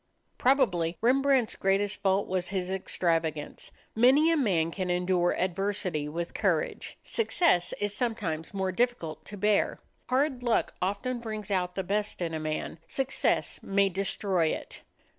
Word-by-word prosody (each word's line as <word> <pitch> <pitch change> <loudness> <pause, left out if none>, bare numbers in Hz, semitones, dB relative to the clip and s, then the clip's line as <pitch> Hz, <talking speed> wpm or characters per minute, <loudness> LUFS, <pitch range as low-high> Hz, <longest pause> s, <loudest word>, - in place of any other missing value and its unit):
Probably 180 - +2
Rembrandt's 265 0 +3
greatest 195 +1 0
fault 195 0 +2
was 180 -1 -1
his 190 -1 -2
extravagance. 165 -5 -1 0.3
Many 270 +8 +5
a - - +3
man 180 - +1
can 185 0 -3
endure 180 0 +1
adversity 185 -4 -1
with 170 +2 -4
courage; - - -1
success 340 - +2
is 205 0 -1
sometimes 205 -10 -2
more 190 -1 -1
difficult 180 - -1
to 205 - -7
bear. 210 +1 +2 0.3
Hard 260 0 +1
luck 240 -2 +1
often 205 +7 -1
brings 215 -3 -6
out 180 -2 0
the 190 - -1
best 205 +3 -1
in 170 -2 -2
a 160 - -2
man; 155 +1 -4
success 270 0 0
may 200 0 +2
destroy 190 -2 0
it. - - -4
195 Hz, 140 wpm, -28 LUFS, 175-235 Hz, 0.3 s, Many